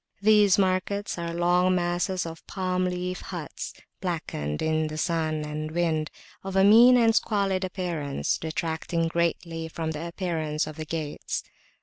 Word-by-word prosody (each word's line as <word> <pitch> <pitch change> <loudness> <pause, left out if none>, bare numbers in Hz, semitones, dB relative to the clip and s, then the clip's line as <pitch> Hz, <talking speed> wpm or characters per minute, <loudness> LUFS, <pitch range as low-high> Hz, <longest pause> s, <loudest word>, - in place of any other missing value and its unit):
These 210 -2 +6
markets 190 0 0
are 170 0 -3
long 175 +2 +3
masses 175 +1 0
of 165 0 -8
palm 185 -1 -1
leaf 180 0 -3
huts, - - -6 0.3
blackened 155 - -3
in 160 0 +1
the 155 0 -6
sun 155 -2 0
and 155 +1 -4
wind, 160 -2 0 0.3
of 195 0 -5
a 190 - +5
mean 235 +5 +8
and 230 -2 +4
squalid 200 -4 +1
appearance, 175 -7 -2
detracting 165 +1 -2
greatly 165 -1 -1
from 160 0 -3
the 160 +2 -4
appearance 165 -4 -2
of 155 -1 -8
the 155 - -5
gates. 155 -2 -4
170 Hz, 145 wpm, -26 LUFS, 160-185 Hz, 0.3 s, mean